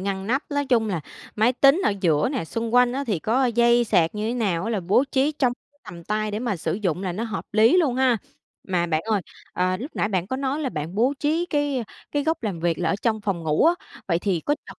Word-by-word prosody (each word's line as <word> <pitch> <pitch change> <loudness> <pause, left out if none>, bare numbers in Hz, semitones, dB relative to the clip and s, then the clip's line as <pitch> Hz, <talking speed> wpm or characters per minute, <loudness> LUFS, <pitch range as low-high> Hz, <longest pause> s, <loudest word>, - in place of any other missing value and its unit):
ngăn 190 0 -3
nắp, 265 +6 +1
nói 285 -1 -1
chung 235 -4 +2
là 180 -5 -2 0.4
máy 220 +3 +3
tính 275 +6 +5
ở - - +3
giữa 155 -2 +2
nè, 260 - -2
xung 230 +7 -4
quanh 245 0 +5
á 275 +2 -2
thì 205 -7 0
có 235 +11 +1
dây 240 0 +3
sạc 170 -6 +2
như 210 +1 -2
thế 235 - -1
nào 195 -8 0
á 225 - -2
là 215 -4 -1
bố 190 +9 +3
trí 280 +2 +2
trong 260 -4 +1 0.3
tầm 170 -1 -10
tay 215 +2 -1
để 210 - -3
mà 230 -4 -2
sử 160 - -2
dụng 185 -3 -2
là 185 -2 -2
nó 215 +6 -3
hợp 220 -4 -4
lý 220 - +5
luôn 305 -9 +2
ha. 255 -2 +3 0.5
Mà 175 -2 +1
bạn 155 -2 0
ơi, 215 -2 0 0.3
ờ, 185 0 0
lúc 265 +10 -7
nãy - - +1
bạn 185 -4 -1
có 260 - -3
nói 275 +2 -2
là 285 - -1
bạn 155 -4 -5
bố 245 +7 +2
trí 320 +4 +1
cái 290 -4 0 0.3
cái 290 -1 0
góc 320 -2 -1
làm 195 -7 -3
việc 170 -1 0
là - - 0
ở - - +1
trong 220 -2 +1
phòng 195 -5 -2
ngủ 155 -1 +2
á, 340 - +5 0.3
vậy 170 -2 +2
thì 185 -3 -1
có 290 - 0
chật - - -12
220 Hz, 265 wpm, -24 LUFS, 185-260 Hz, 0.5 s, tính